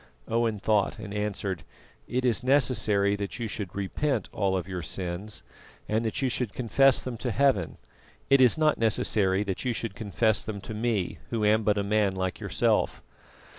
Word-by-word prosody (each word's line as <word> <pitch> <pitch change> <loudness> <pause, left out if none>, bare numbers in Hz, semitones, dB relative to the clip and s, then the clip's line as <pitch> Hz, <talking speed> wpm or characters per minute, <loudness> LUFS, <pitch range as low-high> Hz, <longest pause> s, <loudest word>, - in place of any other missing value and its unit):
Owen 115 -1 0
thought 105 +1 +1
and 105 -2 -7
answered: 100 -3 -3 0.5
"It 125 +1 -1
is 120 0 +1
necessary 120 -7 +2
that 100 -1 -4
you 120 -2 -3
should 100 -4 -6
repent 110 +4 -1
all 95 -2 +1
of 90 - -4
your 90 -2 -4
sins, 90 +5 -5 0.4
and 110 +2 0
that 110 +4 -2
you - - +3
should 125 -4 -2
confess 130 +2 +3
them 125 -2 -5
to 125 - -3
heaven; 125 - +1 0.5
it 135 -1 +5
is 125 +3 +5
not 155 -1 +2
necessary 105 -3 +2
that 95 -3 -3
you 125 -2 0
should 115 -2 -4
confess 110 +1 0
them 105 -2 -5
to 110 - -7
me, 110 -4 -1
who 110 -3 -1
am 110 +1 +4
but 105 -1 +1
a 100 - +1
man 100 -1 +1
like 95 -1 -2
yourself." - - 0
105 Hz, 180 wpm, -27 LUFS, 100-120 Hz, 0.5 s, it